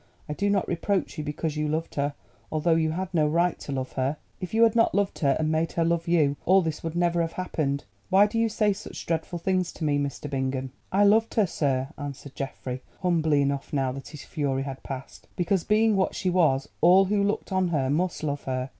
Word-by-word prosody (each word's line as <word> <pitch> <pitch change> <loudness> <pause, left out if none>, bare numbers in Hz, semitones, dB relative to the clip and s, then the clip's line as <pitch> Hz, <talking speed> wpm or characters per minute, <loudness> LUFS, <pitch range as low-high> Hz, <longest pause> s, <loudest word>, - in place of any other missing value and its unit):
I 150 - -3
do 200 +6 0
not 200 -2 +1
reproach 185 0 -1
you - - -2
because 150 +1 -3
you 150 0 -1
loved 160 +2 -2
her, 145 0 -1 0.4
although 155 +2 +2
you 160 -1 +2
had 185 +3 -3
no 155 -3 +3
right 170 +3 +1
to - - -7
love 130 -1 -3
her. 135 +3 -1 0.2
If 185 -2 -5
you 225 +1 +4
had 230 -1 +4
not 230 - +3
loved 200 -1 0
her, 140 -3 +3
and 155 0 0
made 160 +1 0
her 165 - +1
love 170 0 0
you, 150 -5 +3
all 190 +1 +5
this 160 -2 -3
would 165 0 -4
never 175 0 +2
have 165 0 -2
happened. 150 -6 -2 0.3
Why 195 +2 +6
do 220 +2 -1
you 230 0 +2
say 210 -1 +2
such 195 - -8
dreadful 165 +1 -2
things 185 0 0
to - - -7
me, 145 -2 +2
Mr. 140 +1 -3
Bingham?" 130 -1 -2 0.2
"I 200 +2 +4
loved 220 +3 +4
her, 215 - +4
sir," 135 -6 -1
answered 140 -1 -7
Geoffrey, 130 -2 -5 0.2
humbly 160 -5 +3
enough 140 0 -2
now 135 -2 +1
that 135 +1 -8
his 150 -3 -10
fury 140 -4 -2
had 135 -1 -6
passed, 135 -1 -8
"because 180 0 +1
being 215 0 +3
what 190 -1 +1
she 185 - 0
was 155 -7 +2
all 185 +3 +7
who 200 +1 +1
looked 205 0 -1
on 185 -1 +2
her 140 -6 0
must 170 +2 -1
love 145 -2 -2
her. 130 0 -2
160 Hz, 230 wpm, -26 LUFS, 140-185 Hz, 0.4 s, all